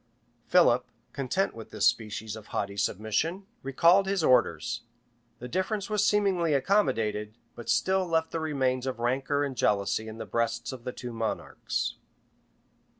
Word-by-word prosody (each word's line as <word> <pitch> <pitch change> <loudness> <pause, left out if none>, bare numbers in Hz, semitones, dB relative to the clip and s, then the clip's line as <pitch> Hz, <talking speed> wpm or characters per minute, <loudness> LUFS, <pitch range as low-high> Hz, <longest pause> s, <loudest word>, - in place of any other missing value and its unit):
Philip, 170 -9 +4 0.2
content 145 +8 0
with 115 -1 -10
this - - -1
species 110 -1 0
of 110 -1 -11
haughty 100 0 -3
submission, 110 - -1 0.2
recalled 170 +8 +4
his 195 -3 0
orders:[] 120 -2 +2 0.6
the 125 - -7
difference 195 - -2
was 210 -2 +2
seemingly 190 -7 +2
accommodated, 115 - +1 0.2
but 120 - -9
still 185 +10 +2
left 160 -1 0
the 165 - -2
remains 135 -5 0
of 130 - -2
rancor 135 +4 0
and 140 -2 -3
jealousy 105 0 +1
in 110 0 -8
the 115 - -5
breasts 115 0 -1
of 125 -3 -9
the 125 - -2
two 125 -1 -7
monarchs. 115 -1 -3
130 Hz, 150 wpm, -28 LUFS, 115-170 Hz, 0.6 s, Philip